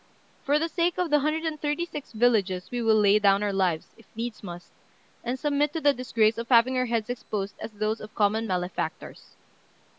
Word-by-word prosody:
For 285 Hz, +2 st, +2 dB
the 325 Hz, +2 st, 0 dB
sake 340 Hz, +2 st, 0 dB
of 360 Hz, -4 st, -1 dB
the 295 Hz, -, +5 dB
hundred 305 Hz, +3 st, -1 dB
and 315 Hz, -2 st, -3 dB
thirty 295 Hz, +3 st, -1 dB
six 295 Hz, -4 st, -8 dB
villages 215 Hz, -6 st, +1 dB
we 245 Hz, -1 st, -2 dB
will 225 Hz, -1 st, +4 dB
lay 205 Hz, 0 st, +5 dB
down 200 Hz, 0 st, +3 dB
our 205 Hz, -1 st, -1 dB
lives, 180 Hz, -5 st, 0 dB
if 225 Hz, -, -19 dB
needs 230 Hz, 0 st, -5 dB
must, 175 Hz, -3 st, -9 dB, 0.5 s
and 245 Hz, +2 st, -2 dB
submit 295 Hz, +1 st, 0 dB
to 325 Hz, -, -2 dB
the 290 Hz, -2 st, +4 dB
disgrace 230 Hz, -3 st, +1 dB
of 235 Hz, -, -6 dB
having 250 Hz, +1 st, +5 dB
our 255 Hz, 0 st, +1 dB
heads 230 Hz, 0 st, -1 dB
exposed 205 Hz, -4 st, -4 dB
as 220 Hz, -, -7 dB
those 215 Hz, +2 st, -2 dB
of 215 Hz, -, -11 dB
common 220 Hz, +2 st, +1 dB
malefactors." 180 Hz, -1 st, -4 dB
230 Hz, 205 wpm, -26 LUFS, 210-290 Hz, 0.5 s, the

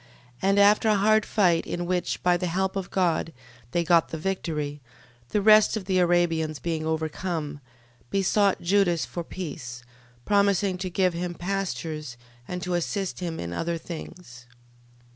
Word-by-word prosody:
12:11. 195 Hz, -, +2 dB
And 200 Hz, +1 st, +4 dB
after 210 Hz, +2 st, +5 dB
a 215 Hz, -, +4 dB
hard 215 Hz, +1 st, +3 dB
fight, 175 Hz, -6 st, +2 dB
in 175 Hz, 0 st, -3 dB
which, 180 Hz, 0 st, -2 dB
by 180 Hz, 0 st, +4 dB
the 180 Hz, +1 st, -1 dB
help 190 Hz, +3 st, -1 dB
of 195 Hz, -2 st, -3 dB
God, 170 Hz, -3 st, 0 dB, 0.4 s
they 170 Hz, +6 st, 0 dB
got 170 Hz, 0 st, +3 dB
the 160 Hz, -, -4 dB
victory, 155 Hz, -5 st, -3 dB, 0.5 s
the 210 Hz, -, 0 dB
rest 215 Hz, +1 st, +6 dB
of 200 Hz, -, -6 dB
the 185 Hz, -1 st, +1 dB
Arabians 170 Hz, -3 st, +2 dB
being 160 Hz, +3 st, -3 dB
overcome, 160 Hz, -1 st, -3 dB, 0.5 s
besought 195 Hz, 0 st, +2 dB
Judas 175 Hz, -2 st, +2 dB
for 175 Hz, -, -5 dB
peace, 140 Hz, -9 st, -7 dB, 0.4 s
promising 200 Hz, -2 st, +2 dB
to 185 Hz, 0 st, -3 dB
give 185 Hz, 0 st, +1 dB
him 175 Hz, +1 st, -4 dB
pastures, 170 Hz, -8 st, -4 dB, 0.3 s
and 180 Hz, 0 st, -5 dB
to 180 Hz, -1 st, -2 dB
assist 185 Hz, +2 st, -2 dB
him 170 Hz, -3 st, -4 dB
in 85 Hz, 0 st, -5 dB
other 165 Hz, -, -2 dB
things. 160 Hz, -7 st, -10 dB
175 Hz, 160 wpm, -26 LUFS, 160-195 Hz, 0.5 s, rest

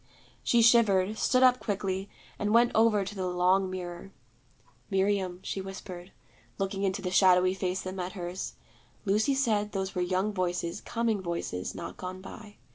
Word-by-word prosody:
She 235 Hz, -1 st, +4 dB
shivered, 215 Hz, -3 st, +4 dB
stood 255 Hz, 0 st, +3 dB
up 255 Hz, -1 st, +6 dB
quickly, 195 Hz, -2 st, -3 dB, 0.3 s
and 210 Hz, +2 st, +1 dB
went 240 Hz, +1 st, +5 dB
over 220 Hz, -3 st, +3 dB
to 195 Hz, -, -6 dB
the 190 Hz, -2 st, -3 dB
long 180 Hz, +2 st, +2 dB
mirror. 180 Hz, 0 st, -6 dB, 0.8 s
'Miriam,' 190 Hz, -2 st, 0 dB
she 195 Hz, -, -3 dB
whispered, 190 Hz, -1 st, -8 dB, 0.5 s
looking 195 Hz, 0 st, -2 dB
into 195 Hz, 0 st, -1 dB
the 180 Hz, -, -2 dB
shadowy 185 Hz, -1 st, +5 dB
face 190 Hz, -1 st, -2 dB
that 185 Hz, -, -5 dB
met 185 Hz, -1 st, -4 dB
hers, 180 Hz, 0 st, -5 dB, 0.5 s
'Lucy 215 Hz, +8 st, +2 dB
said 215 Hz, -6 st, 0 dB
those 190 Hz, -1 st, -2 dB
were 180 Hz, -, -1 dB
young 185 Hz, +4 st, 0 dB
voices, 175 Hz, 0 st, -2 dB
coming 230 Hz, -3 st, -1 dB
voices, 170 Hz, -, -4 dB
not -, -, -7 dB
gone 185 Hz, 0 st, -6 dB
by. 205 Hz, +2 st, -11 dB
195 Hz, 160 wpm, -29 LUFS, 185-210 Hz, 0.8 s, up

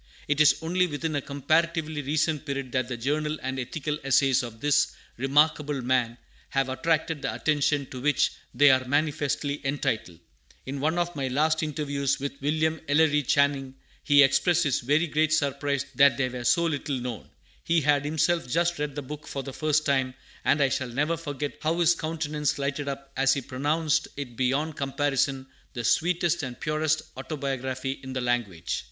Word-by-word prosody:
It 150 Hz, +1 st, +2 dB
is 150 Hz, -, +6 dB
only 180 Hz, +2 st, +1 dB
within 155 Hz, 0 st, -3 dB
a 145 Hz, -, 0 dB
comparatively 155 Hz, +3 st, 0 dB
recent 150 Hz, +1 st, 0 dB
period 140 Hz, -3 st, -4 dB
that 130 Hz, -1 st, 0 dB
the 125 Hz, -2 st, -4 dB
journal 150 Hz, +5 st, -1 dB
and 130 Hz, 0 st, -3 dB
ethical 150 Hz, +4 st, -3 dB
essays 135 Hz, 0 st, +3 dB
of 115 Hz, -3 st, -8 dB
this 145 Hz, +3 st, +2 dB, 0.2 s
remarkable 145 Hz, +2 st, +2 dB
man 125 Hz, -2 st, +1 dB, 0.3 s
have 135 Hz, -1 st, 0 dB
attracted 160 Hz, +2 st, 0 dB
the 135 Hz, -, -1 dB
attention 145 Hz, -2 st, +1 dB
to 130 Hz, -, -6 dB
which 145 Hz, 0 st, +2 dB, 0.2 s
they 145 Hz, +3 st, +6 dB
are 130 Hz, 0 st, +3 dB
manifestly 145 Hz, 0 st, 0 dB
entitled. 115 Hz, -, -2 dB, 0.5 s
In 135 Hz, +1 st, -4 dB
one 155 Hz, +4 st, 0 dB
of 175 Hz, 0 st, -1 dB
my 135 Hz, -2 st, -2 dB
last 155 Hz, +5 st, +1 dB
interviews 145 Hz, -2 st, -1 dB
with 140 Hz, 0 st, -5 dB
William 155 Hz, +2 st, 0 dB
Ellery 150 Hz, 0 st, +3 dB
Channing, 140 Hz, -1 st, +1 dB, 0.3 s
he 145 Hz, -1 st, +6 dB
expressed 135 Hz, +6 st, +3 dB
his 145 Hz, -5 st, +1 dB
very 145 Hz, +7 st, +2 dB
great 155 Hz, 0 st, +1 dB
surprise 140 Hz, -2 st, 0 dB
that 140 Hz, -3 st, +5 dB
they 130 Hz, -2 st, 0 dB
were 125 Hz, -1 st, -6 dB
so 170 Hz, +8 st, +3 dB
little 145 Hz, -3 st, -2 dB
known. 120 Hz, -3 st, -6 dB, 0.3 s
He 165 Hz, -1 st, +2 dB
had 145 Hz, -1 st, +2 dB
himself 160 Hz, 0 st, +1 dB
just 170 Hz, +3 st, +1 dB
read 145 Hz, -2 st, -3 dB
the 145 Hz, -, -4 dB
book 150 Hz, +3 st, -8 dB
for 135 Hz, -, -4 dB
the 135 Hz, -, -7 dB
first 155 Hz, +1 st, +1 dB
time, 130 Hz, -2 st, +1 dB, 0.3 s
and 145 Hz, 0 st, +3 dB
I 135 Hz, -, +3 dB
shall 130 Hz, -1 st, -2 dB
never 150 Hz, +7 st, 0 dB
forget 145 Hz, -3 st, -5 dB
how 165 Hz, +2 st, 0 dB
his 170 Hz, 0 st, +5 dB
countenance 155 Hz, -2 st, -2 dB
lighted 140 Hz, +1 st, -2 dB
up 135 Hz, 0 st, -6 dB
as 135 Hz, 0 st, +3 dB
he 140 Hz, -, -2 dB
pronounced 150 Hz, +5 st, 0 dB
it 130 Hz, -4 st, -6 dB
beyond 140 Hz, +5 st, 0 dB
comparison 135 Hz, -1 st, 0 dB, 0.3 s
the 120 Hz, -, -4 dB
sweetest 170 Hz, +5 st, +1 dB
and 125 Hz, -4 st, -6 dB
purest 155 Hz, 0 st, 0 dB
autobiography 135 Hz, -2 st, -4 dB
in 130 Hz, 0 st, -7 dB
the 130 Hz, -, -2 dB
language. 115 Hz, -9 st, -1 dB
145 Hz, 175 wpm, -26 LUFS, 135-155 Hz, 0.5 s, is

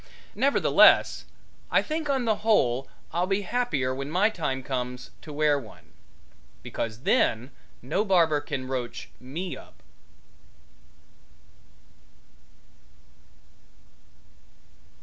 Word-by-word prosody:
Nevertheless, 280 Hz, +1 st, +4 dB, 0.4 s
I -, -, +3 dB
think 310 Hz, -1 st, -3 dB
on 265 Hz, -3 st, +1 dB
the 220 Hz, -2 st, +2 dB
whole 135 Hz, -, +2 dB, 0.3 s
I'll 175 Hz, +2 st, +1 dB
be 195 Hz, +1 st, 0 dB
happier 185 Hz, -, -1 dB
when 135 Hz, +2 st, -5 dB
my 190 Hz, +7 st, +2 dB
time 135 Hz, -9 st, -3 dB
comes 125 Hz, -1 st, -4 dB
to 155 Hz, -, -10 dB
wear 150 Hz, -1 st, +2 dB
one, 110 Hz, -5 st, -15 dB, 0.7 s
because 115 Hz, 0 st, -4 dB
then 120 Hz, 0 st, +1 dB, 0.3 s
no 155 Hz, +11 st, 0 dB
barber 165 Hz, -7 st, +3 dB
can 140 Hz, -3 st, -5 dB
roach 125 Hz, -2 st, -5 dB
me 160 Hz, +9 st, -5 dB
up. -, -, -15 dB
150 Hz, 95 wpm, -26 LUFS, 130-205 Hz, 0.7 s, Nevertheless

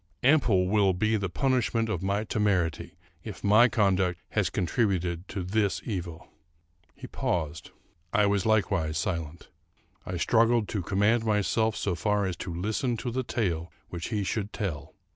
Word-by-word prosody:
Ample 120 Hz, -10 st, +4 dB
will 100 Hz, -1 st, +3 dB
be 110 Hz, +5 st, +1 dB
the 100 Hz, -3 st, -1 dB
punishment 120 Hz, -1 st, +1 dB
of 95 Hz, -6 st, -2 dB
my 100 Hz, +2 st, 0 dB
temerity, 90 Hz, -7 st, -1 dB, 0.3 s
if 110 Hz, -, -8 dB
my 105 Hz, +4 st, +6 dB
conduct 95 Hz, -6 st, +1 dB
has -, -, 0 dB
contributed 90 Hz, -3 st, -1 dB
to 95 Hz, -2 st, -4 dB
this 100 Hz, +2 st, 0 dB
evil." 85 Hz, -6 st, -5 dB, 0.7 s
He -, -, -10 dB
paused. 80 Hz, -2 st, -3 dB, 0.4 s
I 105 Hz, -, +3 dB
likewise 100 Hz, -4 st, +1 dB
was 80 Hz, 0 st, -3 dB
silent. 85 Hz, -1 st, -4 dB, 0.5 s
I 90 Hz, -, -4 dB
struggled 115 Hz, +5 st, +3 dB
to 100 Hz, -, -2 dB
command 105 Hz, +6 st, +2 dB
myself 110 Hz, +1 st, +1 dB
so 100 Hz, -, -1 dB
far 105 Hz, +4 st, 0 dB
as 95 Hz, -2 st, -2 dB
to 90 Hz, -, -5 dB
listen 110 Hz, +8 st, -1 dB
to 120 Hz, +2 st, -4 dB
the 130 Hz, +2 st, -1 dB
tale 90 Hz, -9 st, -2 dB, 0.2 s
which 85 Hz, -1 st, -5 dB
he 105 Hz, -3 st, -1 dB
should 105 Hz, +1 st, -2 dB
tell. 80 Hz, -10 st, -4 dB
100 Hz, 155 wpm, -28 LUFS, 90-110 Hz, 0.7 s, my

